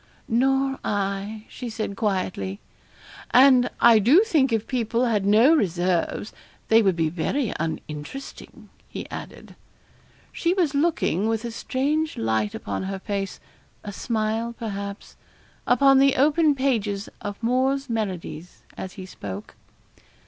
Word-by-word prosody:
'Nor 270 +3 +1
I,' 200 +1 -3
she 245 - -7
said, 215 -2 -4
quietly. 185 - -2 0.7
'And 255 -1 +6
I 230 -2 +7
do 275 - +5
think, 300 - +2
if 225 -1 0
people 240 -1 0
had 210 -5 0
no 225 +9 +6
reserves, 180 - 0 0.4
they 225 +1 +6
would 190 -4 +2
be 165 -1 +1
very 205 - -1
uninteresting,' 160 - -7 0.2
he - - -7
added. - - -9 0.8
She 345 +1 0
was 340 -7 +1
looking, 280 - +1
with 225 +1 -1
a 235 - -4
strange 295 +7 -1
light 110 -2 0
upon 100 -1 -4
her 195 +1 -4
face 195 0 -4 0.4
a 205 - -6
smile, 225 +2 -2
perhaps 200 -2 -6 0.5
upon 270 +2 +5
the 275 0 +4
open 300 +2 +3
pages 220 -7 -1
of 205 0 -5
'Moore's 265 +3 +1
Melodies' 180 - -5
as 190 - -7
he 190 -3 -8
spoke. 100 - -8
220 Hz, 130 wpm, -24 LUFS, 195-265 Hz, 0.8 s, I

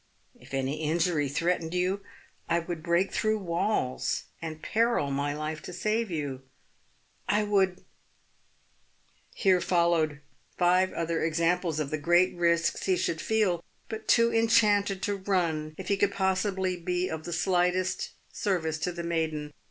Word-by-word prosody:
If - - -18
any 135 +3 -2
injury 160 -2 +1
threatened 170 +3 -1
you, 185 +3 0 0.5
I 170 - +3
would 170 -1 -4
break 170 +3 +1
through 215 0 +1
walls, 175 -7 -1 0.2
and 160 -1 -5
peril 230 -11 +1
my 145 +1 -1
life 155 +1 -4
to 180 - -8
save 215 +5 0
you. 145 -6 -3 0.9
I 210 +1 +3
would 190 -3 +1 0.7
" - - -36
(Here 185 -2 +5
followed 170 -4 +2 0.4
five 180 +1 +3
other 165 0 -1
examples 165 0 +1
of 145 -2 -2
the 155 - -1
great 175 +4 +3
risks 170 -1 +1
he 185 -1 +3
should 160 -2 -1
feel 200 -6 +1 0.3
but 220 0 -6
too 235 0 +4
enchanted 210 -4 +3
to 205 -1 0
run 170 -6 -1
if 190 - -6
he 200 - +2
could 200 0 +2
possibly 190 -1 0
be 180 +1 -1
of 160 -2 -5
the 175 - -5
slightest 180 +1 +1 0.2
service 160 -6 -1
to 180 - -1
the 170 0 -6
maiden. 160 -3 -2
175 Hz, 150 wpm, -28 LUFS, 160-190 Hz, 0.9 s, Here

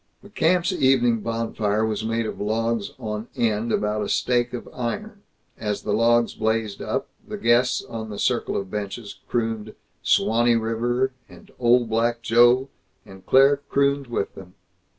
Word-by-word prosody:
The 205 - -13
camp's 180 +1 +2
evening 130 -7 +3
bonfire 110 -1 -1
was 110 -1 -2
made 115 +1 -1
of 110 - -5
logs 115 0 -1
on 110 -2 -5
end 115 0 0
about 105 0 0
a 105 - -3
stake 120 0 +1
of 125 - -6
iron. 200 - -4 0.4
As 105 -2 -3
the 105 - -1
logs 115 +1 +3
blazed 110 -2 -1
up, - - -2 0.2
the - - -5
guests 125 +2 +2
on 110 -1 -6
the 105 - -6
circle - - 0
of 95 -1 -5
benches 105 +1 -5
crooned 110 -2 -2 0.3
"Suwanee 120 +1 +3
River," 120 +4 0 0.2
and - - -16
"Old 120 0 +4
Black 115 +1 0
Joe," 120 +4 +4 0.4
and 95 -1 -14
Claire 135 +2 +6
crooned 140 -1 +1
with 120 -4 -3
them. 90 -1 -13
115 Hz, 155 wpm, -23 LUFS, 110-125 Hz, 0.4 s, Claire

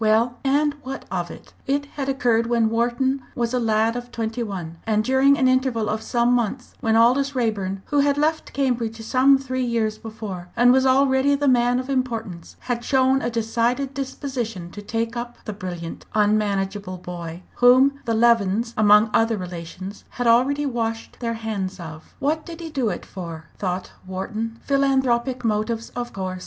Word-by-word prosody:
Well, 225 +3 +2
and 290 +2 +2
what 270 +1 -6
of - - -2
it? - - -12
It 285 +1 0
had 280 -1 -5
occurred 235 -4 +2
when 230 -2 +2
Wharton 245 +4 +1
was 235 0 -1
a 250 - +2
lad 225 0 +2
of 245 0 -6
twenty 225 0 -3
one, 180 -7 -5
and 215 -1 +2
during 265 +3 +4
an 265 -4 +3
interval 255 -4 +1
of 215 0 -1
some 240 +1 +2
months 245 +1 -1
when 225 -3 +1
Aldous 260 +5 +4
Raeburn, 200 -5 -1
who 290 - +1
had 280 0 +3
left 315 +2 0
Cambridge 235 -5 -1
some 260 +4 +4
three 260 -1 -3
years 225 -3 -1
before, 210 -6 -7
and 245 +1 +6
was 265 0 +4
already 265 +1 +4
the 285 0 0
man 245 -1 +3
of 255 - -5
importance, 230 -10 -3
had 240 -1 -3
shown 265 0 +3
a 240 - -1
decided 235 +4 0
disposition 255 -9 -4
to 205 - -8
take 230 +3 -2
up 240 0 -5
the 215 - -4
brilliant, 180 -4 -7
unmanageable 205 -2 0
boy, 175 -1 -7
whom 260 +3 +5
the 230 -1 0
Levens, 230 -1 +3
among 210 +1 +5
other 225 -1 +3
relations, 180 +2 -7
had 245 - -4
already 260 +5 +3
washed 230 -3 -3
their 230 -1 -2
hands 200 -4 -4
of. 160 -2 -10
"What 305 +3 0
did 335 -1 -9
he 330 -2 -7
do 265 -7 0
it 180 - -5
for?" 165 -4 -8
thought 185 -1 -3 0.2
Wharton. 215 +4 -4
"Philanthropic 265 -3 +1
motives 220 +1 -1
of 245 0 -5
course. 185 -1 -4
235 Hz, 175 wpm, -23 LUFS, 215-260 Hz, 0.2 s, and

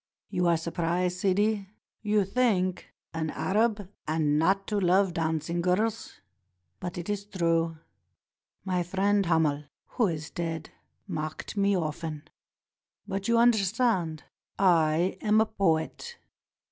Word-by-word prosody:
You 180 -1 +1
are 170 -1 +4
surprised, 175 +2 -1
Sidi? 200 +1 +1 0.3
You 210 -2 +2
think: 195 -4 0 0.2
'An 160 -1 -2
Arab, 210 +3 0 0.2
and 155 -1 +1
not 195 +4 +2
to 210 -1 0
love 185 0 +3
dancing 165 0 -1
girls!' 210 +6 -1 0.6
But 175 -1 -5
it 175 - -5
is 205 -1 -2
true. 165 -4 0 0.9
My 185 -2 0
friend 195 +2 +1
Hamel 155 -3 +2 0.2
who 235 -5 0
is 160 -3 -4
dead 165 -2 -4 0.4
mocked 155 -1 -5
me 200 -1 +2
often. 155 -2 -4 0.8
But, 195 -1 -3
you 235 0 +3
understand, 220 -7 +2 0.3
I 170 -2 +3
am 215 0 +3
a 220 - +4
poet." 200 - -1
180 Hz, 120 wpm, -28 LUFS, 165-205 Hz, 0.9 s, are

